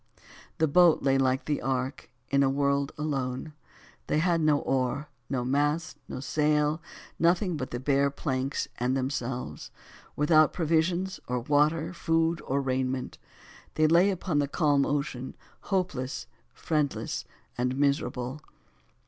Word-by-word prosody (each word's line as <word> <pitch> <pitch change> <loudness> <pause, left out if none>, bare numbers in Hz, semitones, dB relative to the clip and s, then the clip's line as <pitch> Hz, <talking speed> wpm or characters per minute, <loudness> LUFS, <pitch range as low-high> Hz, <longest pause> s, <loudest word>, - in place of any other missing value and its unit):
The 160 - +3
boat 170 +2 +5
lay 135 -1 +3
like 130 0 +1
the 150 -1 -1
ark, 130 +1 -2 0.2
in 140 0 +4
a 135 - +4
world 140 0 +1
alone! 140 -1 -3 0.5
They - - +1
had 170 +1 +2
no 155 -2 +4
oar, 135 +2 -1 0.2
no 125 -3 -1
mast 145 +4 0
and - - -6
no - - -4
sail, 150 +2 +1 0.4
nothing 175 +1 +2
but 130 -4 -4
the 120 - -4
bare 140 +1 +2
planks 135 -1 -2
and 125 +2 +1
themselves, 125 - -3 0.5
without 155 +1 +4
provisions 170 +3 0
or 125 0 -1
water, 150 +5 +2
food 165 -1 +1
or 140 +1 +1
raiment. 130 -1 -2 0.6
They 155 - +3
lay 170 +5 +5
upon 180 -5 -1
the 145 - +1
calm 145 -1 +2
ocean, 140 -3 -3 0.2
hopeless, 165 -10 -2 0.3
friendless 150 -3 -2 0.3
and 125 +1 -1
miserable. 140 -1 0
145 Hz, 135 wpm, -28 LUFS, 130-155 Hz, 0.6 s, boat